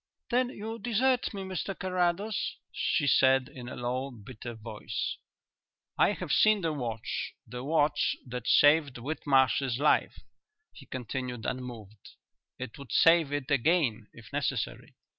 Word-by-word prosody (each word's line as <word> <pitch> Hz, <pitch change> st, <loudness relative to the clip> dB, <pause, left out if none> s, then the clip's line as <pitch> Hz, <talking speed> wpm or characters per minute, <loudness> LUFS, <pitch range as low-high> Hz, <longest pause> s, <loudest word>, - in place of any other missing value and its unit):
"Then 250 Hz, +1 st, +2 dB
you 225 Hz, -1 st, -6 dB
desert 245 Hz, +2 st, +1 dB
me, 195 Hz, -2 st, -5 dB
Mr 190 Hz, 0 st, -4 dB
Carrados?" 185 Hz, +3 st, -1 dB, 0.2 s
she 155 Hz, -, 0 dB
said, 130 Hz, -1 st, +4 dB
in 125 Hz, -1 st, -8 dB
a -, -, -7 dB
low, 125 Hz, +3 st, -2 dB
bitter 120 Hz, 0 st, -9 dB
voice. 110 Hz, -1 st, -4 dB, 0.8 s
"I -, -, +4 dB
have -, -, -5 dB
seen 215 Hz, -1 st, +5 dB
the 165 Hz, -2 st, 0 dB
watch 115 Hz, -6 st, -4 dB
the 125 Hz, 0 st, -7 dB
watch 145 Hz, 0 st, +2 dB
that 125 Hz, -1 st, -6 dB
saved 145 Hz, -2 st, +5 dB
Whitmarsh's 135 Hz, -2 st, +1 dB
life," 150 Hz, +3 st, +2 dB, 0.6 s
he 135 Hz, -, -14 dB
continued, 125 Hz, -1 st, -5 dB
unmoved. 115 Hz, -5 st, -6 dB, 0.4 s
"It 130 Hz, +1 st, -7 dB
would 140 Hz, -3 st, -10 dB
save 165 Hz, -3 st, +5 dB
it 145 Hz, -1 st, -3 dB
again 135 Hz, -6 st, +2 dB
if 110 Hz, -5 st, -15 dB
necessary. -, -, -2 dB
135 Hz, 135 wpm, -29 LUFS, 125-170 Hz, 0.8 s, seen